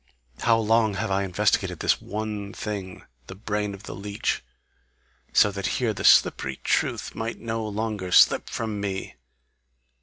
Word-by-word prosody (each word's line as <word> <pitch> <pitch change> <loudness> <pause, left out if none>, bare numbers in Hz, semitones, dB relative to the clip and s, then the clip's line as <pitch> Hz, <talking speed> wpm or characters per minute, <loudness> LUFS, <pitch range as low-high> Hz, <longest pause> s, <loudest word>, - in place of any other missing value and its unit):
How 115 -1 +3
long 110 -1 +2
have 95 - -2
I 95 +1 +2
investigated 95 -3 +1
this - - +1
one 105 -1 -5
thing, 100 -3 -6 0.2
the 95 - -8
brain 105 0 -3
of 100 - -14
the - - -7
leech, 100 +2 -3 0.9
so 105 - +5
that 100 -1 -3
here 120 -4 0
the 100 - -6
slippery 65 -1 +4
truth - - 0
might 115 +1 -4
no 115 -1 -3
longer 105 -3 -3
slip - - +5
from 110 -3 -3
me! 95 -1 -4
105 Hz, 150 wpm, -25 LUFS, 100-110 Hz, 0.9 s, so